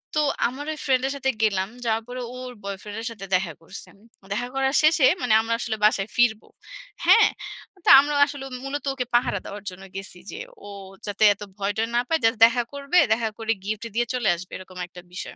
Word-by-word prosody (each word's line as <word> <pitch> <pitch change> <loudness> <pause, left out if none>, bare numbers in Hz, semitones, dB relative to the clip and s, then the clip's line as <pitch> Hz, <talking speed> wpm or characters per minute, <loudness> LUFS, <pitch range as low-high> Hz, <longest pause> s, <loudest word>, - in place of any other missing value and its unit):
তো 305 - +3 0.3
আমার 270 +4 -7
ঐ - - -7
ফ্রেন্ড 260 -2 +2
এর - - -2
সাথে 265 -1 0
গেলাম। 195 -3 +1 0.2
যাওয়ার 225 0 0
পরে 250 0 -6
ও - - -9
ওর 250 - -8
বয়ফ্রেন্ড 200 +2 -6
এর 230 - -4
সাথে 205 -3 -9
দেখা 180 -3 -1
করসে, 165 - -10 0.4
দেখা 240 +4 -2
করার 270 0 +1
শেষে 310 -3 +5 0.2
মানে 245 -3 +2
আমরা 230 +1 -1
আসলে 220 -2 -3
বাসায় 205 -1 +2
ফিরব। 240 -3 +3 0.6
হ্যাঁ? - - +7 0.6
তো - - +4
আমরা 290 +1 +1
আসলেও 275 -2 -7
মূলত 285 +1 -4
ওকে 255 -2 -3
পাহারা 240 -4 +2
দেওয়ার 205 0 -8
জন্য 185 +1 -12
গেছি 195 -2 -7
যে, 420 - -7 0.3
ও - - -8 0.4
যাতে 205 +1 -1
এত 200 - -24 0.2
ভয় 200 0 -1
টয় 225 +1 0
না 240 - +4
পায়। 325 - +2
জাস্ট 225 0 +3
দেখা 240 +1 +2
করবে, 280 +5 -1 0.2
দেখা 225 0 -1
করে 225 0 -1
গিফট 215 +2 -3
দিয়ে 240 - +2
চলে 245 -4 -1
আসবে। 180 +2 -10
এরকম 185 0 -13
একটা 180 0 -12
বিষয়। - - -7
225 Hz, 210 wpm, -24 LUFS, 205-265 Hz, 0.6 s, হ্যাঁ